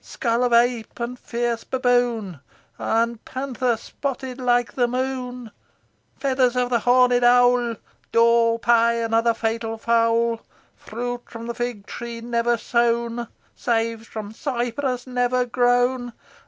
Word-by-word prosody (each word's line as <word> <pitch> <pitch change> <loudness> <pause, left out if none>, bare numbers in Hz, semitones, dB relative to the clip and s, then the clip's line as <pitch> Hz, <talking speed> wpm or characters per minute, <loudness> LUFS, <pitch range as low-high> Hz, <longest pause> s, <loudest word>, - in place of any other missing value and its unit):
Skull 235 0 -1
of 245 - +1
ape 235 0 +2
and 240 +1 -4
fierce 235 -1 -2
baboon, 245 - 0 0.4
And 230 0 0
panther 255 -3 -2
spotted 265 +2 -5
like 245 -1 +1
the 245 -2 +1
moon; 250 -2 -4 0.7
Feathers 260 -2 +1
of 250 0 0
the 235 - +3
horned 245 +1 +4
owl, 245 -1 +4 0.4
Daw, 230 0 +4
pie, 235 0 +3
and 230 -1 -2
other 230 0 +3
fatal 225 0 -2
fowl. 230 0 +1 0.3
Fruit 245 +2 -5
from 230 +1 -6
fig 240 -4 -4
tree 235 -1 -7
never 235 0 0
sown, 235 0 0 0.3
Seed 225 -1 -1
from 215 -1 -7
cypress 245 0 -2
never 250 0 0
grown. 245 0 +1
240 Hz, 125 wpm, -23 LUFS, 230-245 Hz, 0.7 s, horned